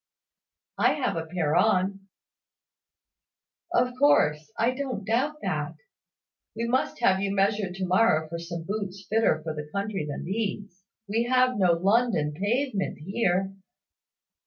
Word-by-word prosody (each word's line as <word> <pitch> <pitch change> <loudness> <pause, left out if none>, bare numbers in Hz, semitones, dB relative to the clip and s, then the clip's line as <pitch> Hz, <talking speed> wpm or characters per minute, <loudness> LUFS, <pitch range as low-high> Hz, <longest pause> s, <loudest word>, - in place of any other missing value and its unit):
"I - - +4
have 255 - -1
a 165 -1 -4
pair 160 -3 -1
on." 195 0 +2 1.6
"Of 250 +1 +2
course; 155 - +3
I 235 +2 +2
don't 255 -6 -4
doubt 270 +8 0
that. - - -2 0.8
We 230 +1 -2
must 250 0 0
have 190 -5 +4
you 195 0 -1
measured 195 -1 +1
to 190 -1 -2
morrow 180 -4 +3
for 170 +2 -5
some 170 0 -6
boots 195 0 -5
fitter 215 -8 +2
for 160 -1 -3
the 150 -1 -7
country 200 -4 -3
than 145 - -5
these. 200 -1 -4 0.3
We 225 +4 0
have 255 -2 +2
no 180 -3 +4
London 190 -4 +2
pavement 205 - -1
here." 190 +2 0
195 Hz, 135 wpm, -26 LUFS, 175-230 Hz, 1.6 s, I